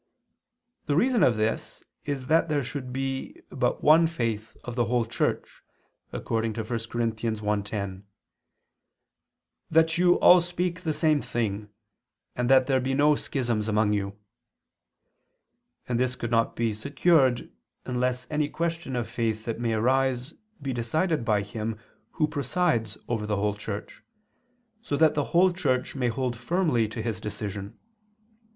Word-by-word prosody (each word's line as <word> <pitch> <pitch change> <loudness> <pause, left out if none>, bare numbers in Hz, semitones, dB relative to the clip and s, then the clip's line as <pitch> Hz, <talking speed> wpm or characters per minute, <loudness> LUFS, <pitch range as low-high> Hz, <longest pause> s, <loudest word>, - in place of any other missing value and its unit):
The 145 - +1
reason 240 - +3
of 120 -9 +4
this 110 +1 -2 0.2
is 140 -3 -3
that 160 +4 +3
there 145 -2 +1
should 130 0 -5
be 135 +1 -4
but 125 -2 -1
one 160 +2 +6
faith 115 -8 -3
of 125 - -6
the 120 -2 +2
whole 120 +1 +1
Church, 115 - -2 0.5
according 115 0 -2
to 110 - -3
1 - - -12 0.2
Cor. 120 - -2
1:10: 105 -3 -2 1.7
"That 160 +1 +3
you 180 0 +5
all 180 0 +7
speak 175 0 -2
the 160 -4 -1
same 155 -2 +2
thing, 105 -3 -3 0.7
and 125 0 -1
that 130 -1 +6
there 135 -1 +2
be 135 +1 -1
no 145 +2 +5
schisms 120 -7 -2
among 105 -1 +2
you": 100 -1 -2 1.7
and 120 -1 0
this 125 0 0
could 120 -2 -5
not 115 -1 +2
be 115 -2 0
secured 135 +2 +2 0.3
unless 125 0 -1
any 150 -1 0
question 165 -4 -3
of 120 -3 -2
faith 110 -2 -2
that 115 -1 -3
may 115 -1 0
arise 130 +4 +1 0.3
be 135 -2 -3
decided 155 +6 0
by 105 -3 +1
him 110 +1 -4 0.4
who 155 - +1
presides 140 - 0
over 110 -3 -2
the 105 - 0
whole 105 +1 0
Church, 105 0 -7 0.8
so 145 -10 -2
that 160 0 +5
the 145 -1 0
whole 180 +1 +4
Church 130 -7 0
may 130 -3 0
hold 120 +1 -1
firmly 125 - +1
to 110 +1 -5
his 110 -4 -3
decision. 100 -1 -6
125 Hz, 150 wpm, -27 LUFS, 110-150 Hz, 1.7 s, all